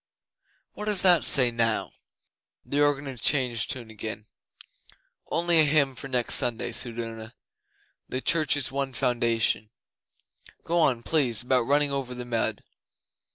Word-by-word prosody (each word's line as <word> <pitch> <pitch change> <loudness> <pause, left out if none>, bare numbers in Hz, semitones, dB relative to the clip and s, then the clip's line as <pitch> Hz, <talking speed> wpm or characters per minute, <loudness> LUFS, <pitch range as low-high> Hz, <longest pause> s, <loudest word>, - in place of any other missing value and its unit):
What 210 - -8
does 210 -3 +3
that 180 -3 +5
say 125 -4 +6
now?' 115 -1 -1 0.7
The 145 +1 -1
organ 145 -1 +1
had 130 -5 -7
changed 125 -6 +1
tune 125 -6 -6
again. 105 -1 -7 1.0
'Only 170 0 +2
a - - +6
hymn 145 -2 +1
for 130 - -9
next 125 -3 +3
Sunday,' 120 0 0
said 120 0 -3
Una. 115 0 -7 0.7
'"The 130 - -3
Church's 145 -5 +1
One 135 -1 -3
Foundation." 115 -3 0 0.9
Go 170 +1 -1
on, 130 -7 +1
please, 125 -9 0
about 125 -1 +1
running 145 +1 +1
over 135 -2 -4
the 125 0 -7
mud. 115 -2 -1
130 Hz, 140 wpm, -25 LUFS, 115-145 Hz, 1.0 s, say